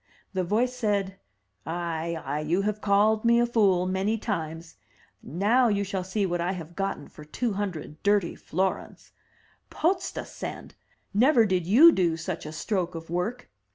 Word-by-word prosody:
The 185 Hz, -1 st, 0 dB
voice 235 Hz, +8 st, 0 dB
said, 200 Hz, -5 st, -1 dB, 0.4 s
'*Ay, 170 Hz, 0 st, -3 dB
ay, 145 Hz, +3 st, -2 dB
you 165 Hz, +6 st, 0 dB
have 210 Hz, +1 st, -2 dB
called 210 Hz, +2 st, +3 dB
me 235 Hz, 0 st, +4 dB
a 240 Hz, -, +4 dB
fool 200 Hz, -7 st, +2 dB
many 190 Hz, +4 st, 0 dB
times. 165 Hz, -6 st, -5 dB, 0.4 s
Now 215 Hz, -, +2 dB
you 200 Hz, -2 st, +1 dB
shall 190 Hz, -1 st, -3 dB
see 195 Hz, +2 st, -1 dB
what 175 Hz, -2 st, -1 dB
I 180 Hz, +2 st, 0 dB
have 170 Hz, -2 st, -8 dB
gotten 195 Hz, -6 st, -3 dB
for 150 Hz, -, -13 dB
two 215 Hz, +9 st, -2 dB
hundred 180 Hz, -6 st, -5 dB
dirty 200 Hz, -3 st, +2 dB
florins. 185 Hz, +3 st, -3 dB, 0.6 s
Potztausend! 365 Hz, +3 st, -3 dB, 0.4 s
never 235 Hz, +2 st, +5 dB
did 185 Hz, -4 st, 0 dB
you 280 Hz, -, +8 dB
do 170 Hz, -, +1 dB
such 165 Hz, -1 st, -5 dB
a -, -, -6 dB
stroke 180 Hz, +1 st, -2 dB
of 165 Hz, 0 st, -8 dB
work!'' 215 Hz, +8 st, -3 dB
195 Hz, 155 wpm, -26 LUFS, 170-215 Hz, 0.6 s, you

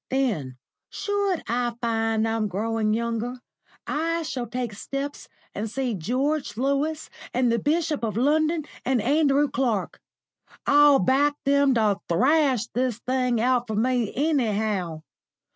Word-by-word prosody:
Then, 200 Hz, -, -1 dB, 0.3 s
should 405 Hz, -3 st, -1 dB
I 240 Hz, 0 st, -1 dB
find 225 Hz, -1 st, 0 dB
I'm 225 Hz, -1 st, 0 dB
growing 215 Hz, +2 st, -1 dB
younger, 235 Hz, +2 st, -1 dB, 0.5 s
I 330 Hz, +2 st, -1 dB
shall 255 Hz, -6 st, -4 dB
take 245 Hz, -1 st, -4 dB
steps 275 Hz, +7 st, -5 dB, 0.3 s
and 215 Hz, +2 st, -3 dB
see 255 Hz, +1 st, -2 dB
George 255 Hz, -, -1 dB
Lewis, 280 Hz, +4 st, -1 dB, 0.2 s
and 250 Hz, -1 st, +2 dB
the 235 Hz, -, +1 dB
Bishop 305 Hz, +1 st, 0 dB
of 220 Hz, -2 st, -2 dB
London, 310 Hz, +4 st, +2 dB, 0.2 s
and 260 Hz, -1 st, +1 dB
Andrew 285 Hz, +4 st, +3 dB
Clark. 245 Hz, -6 st, -2 dB, 0.6 s
I'll 290 Hz, -1 st, +6 dB
back 275 Hz, +7 st, +2 dB
them 280 Hz, -1 st, +3 dB
to 210 Hz, -3 st, +2 dB
thrash 260 Hz, -, +3 dB
this 250 Hz, -2 st, 0 dB
thing 250 Hz, -1 st, 0 dB
out 245 Hz, +1 st, +1 dB
for 220 Hz, -, -3 dB
me 240 Hz, 0 st, +1 dB
anyhow. 215 Hz, -, 0 dB
250 Hz, 130 wpm, -25 LUFS, 225-285 Hz, 0.6 s, I'll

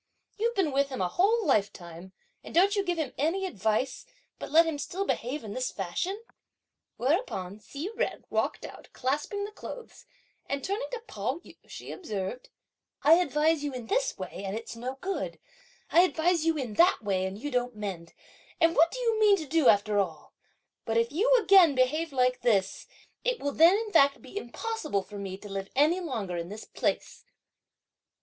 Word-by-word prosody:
You've 465 Hz, +2 st, -1 dB
been 365 Hz, -7 st, +1 dB
with 275 Hz, +1 st, +1 dB
him 260 Hz, -, -5 dB
a 185 Hz, -, +1 dB
whole 415 Hz, -, +2 dB
lifetime, 190 Hz, -, -1 dB, 0.3 s
and -, -, -10 dB
don't 390 Hz, +4 st, +5 dB
you 400 Hz, -, +1 dB
give 350 Hz, -3 st, -1 dB
him 310 Hz, -5 st, -2 dB
any 340 Hz, +7 st, +1 dB
advice; 220 Hz, -, -1 dB, 0.4 s
but -, -, -6 dB
let 325 Hz, +3 st, +6 dB
him 320 Hz, -3 st, -2 dB
still 385 Hz, +6 st, -3 dB
behave 270 Hz, -3 st, -2 dB
in 205 Hz, -2 st, -6 dB
this 255 Hz, 0 st, -2 dB
fashion!" 345 Hz, -, -3 dB, 0.8 s
Whereupon, 240 Hz, -, -1 dB
Hsi 280 Hz, -, -6 dB
Jen 470 Hz, -, -2 dB
walked -, -, -1 dB
out, -, -, -11 dB
clasping 295 Hz, +10 st, -2 dB
the 415 Hz, -, -8 dB
clothes, 470 Hz, +2 st, -10 dB, 0.4 s
and 280 Hz, 0 st, -3 dB
turning 405 Hz, +6 st, -2 dB
to 465 Hz, -2 st, -5 dB
Pao 255 Hz, -, -3 dB
yü, -, -, -14 dB
she -, -, -9 dB
observed, 215 Hz, -, -5 dB, 0.5 s
"I 305 Hz, -, +7 dB
advise 310 Hz, -1 st, +1 dB
you 290 Hz, -2 st, -3 dB
in 250 Hz, -2 st, -6 dB
this -, -, 0 dB
way 190 Hz, 0 st, -7 dB
and 195 Hz, +2 st, -3 dB
it's 230 Hz, 0 st, -8 dB
no 255 Hz, +3 st, -5 dB
good, 390 Hz, +1 st, -3 dB, 0.5 s
I 340 Hz, -, +7 dB
advise 335 Hz, -2 st, +2 dB
you 325 Hz, -1 st, +2 dB
in 250 Hz, -6 st, -4 dB
that 345 Hz, -, +4 dB
way 190 Hz, -2 st, 0 dB
and 190 Hz, +1 st, -6 dB
you 290 Hz, +7 st, -5 dB
don't 250 Hz, -1 st, -1 dB
mend; 190 Hz, -6 st, -6 dB, 0.4 s
and 330 Hz, -1 st, +4 dB
what 330 Hz, +3 st, +5 dB
do -, -, -7 dB
you 460 Hz, -3 st, 0 dB
mean 415 Hz, -2 st, +6 dB
to 320 Hz, -, -5 dB
do 310 Hz, 0 st, +2 dB
after 205 Hz, 0 st, +3 dB
all? 195 Hz, -, -3 dB, 0.5 s
But 225 Hz, 0 st, -1 dB
if 230 Hz, +1 st, +2 dB
you 410 Hz, +12 st, +1 dB
again 380 Hz, -8 st, +6 dB
behave 300 Hz, +6 st, +1 dB
like 250 Hz, -2 st, +1 dB
this, 205 Hz, -6 st, +1 dB, 0.4 s
it -, -, 0 dB
will 285 Hz, -, -2 dB
then, 335 Hz, +4 st, +6 dB
in 440 Hz, -1 st, -4 dB
fact, 280 Hz, -5 st, +5 dB
be 260 Hz, +7 st, -14 dB
impossible 310 Hz, -, -3 dB
for 205 Hz, 0 st, -9 dB
me 190 Hz, -1 st, -5 dB
to 205 Hz, -, -11 dB
live 195 Hz, -1 st, -5 dB
any 310 Hz, +6 st, +4 dB
longer 220 Hz, -, -4 dB
in 170 Hz, 0 st, -4 dB
this 210 Hz, +2 st, -8 dB
place!" -, -, -3 dB
280 Hz, 190 wpm, -28 LUFS, 215-360 Hz, 0.8 s, I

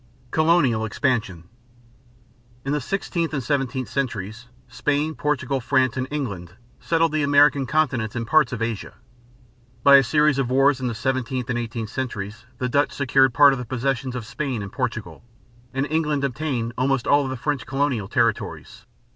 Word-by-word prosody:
COLONIAL 155 Hz, -8 st, +3 dB
EXPANSION. 110 Hz, -, -1 dB, 1.2 s
In 135 Hz, -, -1 dB
the 150 Hz, -, 0 dB
sixteenth 170 Hz, 0 st, -2 dB
and 135 Hz, -, -2 dB
seventeenth 130 Hz, -1 st, -1 dB
centuries, 115 Hz, -3 st, -4 dB, 0.2 s
Spain, 150 Hz, +2 st, -1 dB
Portugal, 140 Hz, -3 st, -1 dB
France, 130 Hz, -1 st, +1 dB
and 130 Hz, 0 st, -2 dB
England 100 Hz, -, -4 dB, 0.3 s
settled 165 Hz, -1 st, +1 dB
the 155 Hz, 0 st, 0 dB
American 145 Hz, -1 st, +4 dB
continents 130 Hz, -7 st, 0 dB
and 115 Hz, -1 st, -2 dB
parts 155 Hz, +3 st, +3 dB
of 115 Hz, -3 st, -3 dB
Asia. 115 Hz, -3 st, -4 dB, 0.9 s
By 140 Hz, 0 st, +9 dB
a 135 Hz, -, +5 dB
series 150 Hz, +1 st, +2 dB
of 130 Hz, -3 st, 0 dB
wars 135 Hz, +1 st, +3 dB
in 125 Hz, -, -1 dB
the 120 Hz, -, -3 dB
seventeenth 130 Hz, +1 st, -2 dB
and 120 Hz, -, -1 dB
eighteenth 115 Hz, -2 st, -5 dB
centuries 115 Hz, -3 st, -5 dB
the 125 Hz, -, -1 dB
Dutch 145 Hz, +3 st, +1 dB
secured 135 Hz, -2 st, +2 dB
part 145 Hz, -1 st, +7 dB
of 135 Hz, -, -3 dB
the 125 Hz, -, -5 dB
possessions 130 Hz, +1 st, -2 dB
of 120 Hz, -3 st, -5 dB
Spain 130 Hz, -2 st, -3 dB
and 100 Hz, -, -8 dB
Portugal; -, -, -4 dB, 0.5 s
and 135 Hz, +1 st, -1 dB
England 150 Hz, -2 st, 0 dB
obtained 125 Hz, -3 st, -2 dB
almost 130 Hz, -1 st, +1 dB
all 145 Hz, 0 st, +4 dB
of -, -, -3 dB
the 130 Hz, -, -4 dB
French 145 Hz, +1 st, -2 dB
colonial 135 Hz, -6 st, -1 dB
territories. -, -, -2 dB
130 Hz, 165 wpm, -23 LUFS, 120-145 Hz, 1.2 s, By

